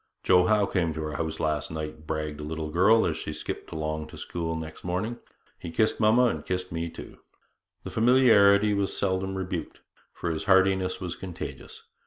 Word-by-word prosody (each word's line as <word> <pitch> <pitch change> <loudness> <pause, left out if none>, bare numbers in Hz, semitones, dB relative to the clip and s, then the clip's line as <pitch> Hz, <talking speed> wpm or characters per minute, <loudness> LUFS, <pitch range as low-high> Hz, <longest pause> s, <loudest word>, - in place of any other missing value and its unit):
'Joe 90 -1 +5
Howe 105 -1 +3
came 85 -5 -1
to 80 - -3
our 75 -1 -4
house 80 -1 -3
last 75 -2 -1
night,' 75 -1 -6
bragged 75 -1 -3
a - - -6
little 80 0 -4
girl 105 +7 +5
as - - 0
she - - -5
skipped - - -6
along 80 0 -3
to - - -12
school 80 -1 -4
next 80 -1 -7
morning; 95 +7 -2 0.4
'he 85 - -7
kissed 110 +7 +1
mamma 110 +3 +5
and 120 - 0
kissed 90 0 -3
me 85 +1 -3
too.' - - -11 0.6
The - - -7
familiarity 110 -4 +5
was 100 -1 -1
seldom 95 0 -1
rebuked, 90 -4 -5 0.3
for 85 - -3
his 80 - -4
heartiness 95 -1 +3
was 90 -2 -4
contagious. 90 -2 -8
90 Hz, 185 wpm, -27 LUFS, 80-100 Hz, 0.6 s, Joe